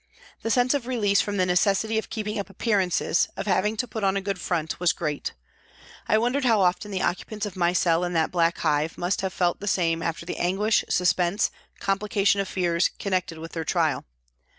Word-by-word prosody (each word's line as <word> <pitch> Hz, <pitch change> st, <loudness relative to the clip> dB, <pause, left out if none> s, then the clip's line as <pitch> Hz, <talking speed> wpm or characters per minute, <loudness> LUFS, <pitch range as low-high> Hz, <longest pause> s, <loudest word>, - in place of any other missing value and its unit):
The 225 Hz, -, -2 dB
sense 245 Hz, +3 st, +3 dB
of 270 Hz, -4 st, -2 dB
release 205 Hz, -6 st, +2 dB
from 205 Hz, -1 st, -3 dB
the 185 Hz, -, +3 dB
necessity 200 Hz, +4 st, +2 dB
of -, -, -7 dB
keeping 210 Hz, -1 st, -3 dB
up 200 Hz, -, -5 dB
appearances, 195 Hz, -5 st, +1 dB
of -, -, -3 dB
having 210 Hz, +2 st, +1 dB
to 250 Hz, -, -1 dB
put 220 Hz, -1 st, -5 dB
on 195 Hz, 0 st, +2 dB
a -, -, +1 dB
good 195 Hz, -1 st, -3 dB
front, 160 Hz, -3 st, -2 dB
was 175 Hz, -2 st, +3 dB
great. 150 Hz, -3 st, -3 dB, 0.7 s
I 215 Hz, -, +4 dB
wondered 245 Hz, +5 st, +1 dB
how 225 Hz, -5 st, +4 dB
often 185 Hz, +3 st, +1 dB
the 190 Hz, -2 st, -2 dB
occupants 210 Hz, +4 st, -2 dB
of 200 Hz, -2 st, -6 dB
my 175 Hz, -2 st, +2 dB
cell 170 Hz, -1 st, +2 dB
in 175 Hz, 0 st, -2 dB
that 160 Hz, -1 st, +1 dB
black 170 Hz, -1 st, +2 dB
hive 155 Hz, 0 st, 0 dB
must 175 Hz, +2 st, -1 dB
have 190 Hz, -1 st, -2 dB
felt 175 Hz, -2 st, 0 dB
the 205 Hz, -, -6 dB
same 165 Hz, -4 st, +1 dB
after 165 Hz, 0 st, -3 dB
the 180 Hz, -, -5 dB
anguish, 200 Hz, +5 st, +2 dB
suspense, 180 Hz, +1 st, +2 dB, 0.3 s
complication 200 Hz, 0 st, +1 dB
of 195 Hz, -, -4 dB
fears, 175 Hz, -2 st, +1 dB
connected 185 Hz, -4 st, -2 dB
with 165 Hz, +1 st, -8 dB
their 165 Hz, -, -3 dB
trial. -, -, 0 dB
190 Hz, 205 wpm, -25 LUFS, 175-210 Hz, 0.7 s, I